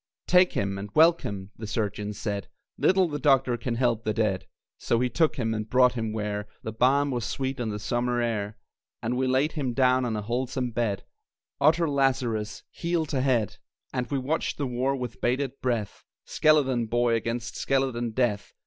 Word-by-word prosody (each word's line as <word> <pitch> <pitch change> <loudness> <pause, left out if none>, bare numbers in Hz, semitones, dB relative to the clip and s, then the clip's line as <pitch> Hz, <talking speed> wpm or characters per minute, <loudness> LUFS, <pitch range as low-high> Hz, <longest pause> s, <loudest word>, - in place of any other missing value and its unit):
"Take 180 0 +5
him 100 -1 -1
and 100 +1 -6
welcome!" 130 - +3
the 110 - -6
surgeons 105 -1 -3
said, 100 -3 -3 0.3
"Little 190 -1 +3
the 145 -2 -4
doctor 135 -4 +3
can 120 0 -3
help 120 -2 +1
the 110 -2 -1
dead!" 105 -4 0 0.3
So 115 - +1
we 125 +1 +1
took 160 +6 +2
him 115 -4 -1
and 110 0 -4
brought 125 +1 +5
him 115 -3 -2
where 105 -1 -3 0.2
The 110 - -4
balm 135 +5 +3
was 120 -2 -2
sweet 135 +3 -3
on 115 - -1
the 105 - -3
summer 120 +3 -1
air; 110 -2 -2 0.5
And 120 +2 -1
we 130 +1 +1
laid 130 +4 +2
him 135 -6 -2
down 130 0 +3
on 115 -2 -1
a 105 - -3
wholesome 125 +2 -2
bed 110 -4 -1 0.6
Utter 160 +4 +4
Lazarus, 130 -6 0
heel 170 -1 -1
to 140 -3 -1
head! 125 -6 +1 0.4
And 125 -2 -2
we 140 - 0
watched 140 +5 -1
the 145 - -1
war 130 +2 0
with 125 -3 -6
bated 130 +2 -1
breath 115 -5 -2 0.2
Skeleton 135 -6 +3
Boy 120 +1 +2
against 115 +1 -2
skeleton 130 -3 0
Death. 110 -3 -1
120 Hz, 185 wpm, -27 LUFS, 110-135 Hz, 0.6 s, Take